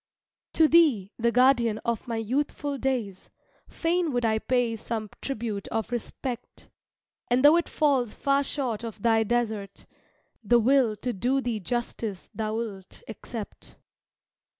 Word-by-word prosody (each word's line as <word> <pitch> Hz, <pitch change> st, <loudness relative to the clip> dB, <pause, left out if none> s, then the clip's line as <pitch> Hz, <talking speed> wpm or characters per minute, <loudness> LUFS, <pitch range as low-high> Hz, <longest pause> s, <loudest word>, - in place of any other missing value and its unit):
To 320 Hz, -, +5 dB
thee, 280 Hz, -, +4 dB
the 235 Hz, +1 st, +2 dB
guardian 240 Hz, -3 st, +4 dB
of 235 Hz, -1 st, -2 dB
my 230 Hz, -, -2 dB
youthful 280 Hz, +4 st, -2 dB
days, 235 Hz, -8 st, -2 dB, 0.4 s
Fain 340 Hz, -1 st, 0 dB
would 245 Hz, -2 st, 0 dB
I 220 Hz, -1 st, +2 dB
pay 245 Hz, -1 st, 0 dB
some 220 Hz, -1 st, -5 dB
tribute 225 Hz, -6 st, -4 dB
of 225 Hz, +2 st, -3 dB
respect; 240 Hz, +1 st, -5 dB, 0.6 s
And 250 Hz, +3 st, +3 dB
though 300 Hz, +3 st, +8 dB
it 340 Hz, -, +1 dB
falls 270 Hz, -7 st, +1 dB
far 280 Hz, 0 st, +2 dB
short 255 Hz, -6 st, -3 dB
of 220 Hz, -3 st, -7 dB
thy 225 Hz, -1 st, +4 dB
desert, 220 Hz, -4 st, -2 dB, 0.6 s
The 240 Hz, +3 st, +4 dB
will 240 Hz, -1 st, +3 dB
to 245 Hz, +4 st, -3 dB
do 250 Hz, +8 st, +1 dB
thee 240 Hz, -4 st, -2 dB
justice 225 Hz, -2 st, -4 dB
thou'lt 215 Hz, -3 st, -4 dB
accept. 220 Hz, 0 st, -8 dB
235 Hz, 135 wpm, -27 LUFS, 220-265 Hz, 0.6 s, though